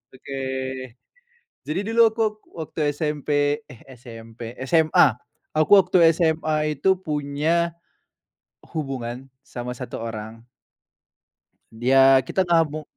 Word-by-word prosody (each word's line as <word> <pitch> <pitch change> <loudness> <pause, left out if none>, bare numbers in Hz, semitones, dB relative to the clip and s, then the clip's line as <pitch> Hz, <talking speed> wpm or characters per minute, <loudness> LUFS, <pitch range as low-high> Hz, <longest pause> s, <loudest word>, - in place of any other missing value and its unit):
Oke. 135 +1 -7 1.3
Jadi 155 +5 -2
dulu 235 - +2
aku 225 +1 -8
wak 210 0 -4 0.4
waktu - - -4 0.2
SMP, 150 -2 -3 0.4
eh, 120 - -14 0.2
SMP, 115 0 -10
SMA. 160 -2 +5 0.5
Aku 155 +2 +1
waktu 170 -3 +4
SMA 155 -2 0
itu 190 +4 +3
punya, 155 +2 -1 0.9
hubungan 135 -5 -5 0.2
sama 125 -2 -7
1 125 0 -7
orang. 115 0 -7 1.3
Dia 135 +3 +5
kita 190 - +1
nggak 170 -2 +3
mung 155 +1 -6
145 Hz, 105 wpm, -23 LUFS, 125-165 Hz, 1.3 s, SMA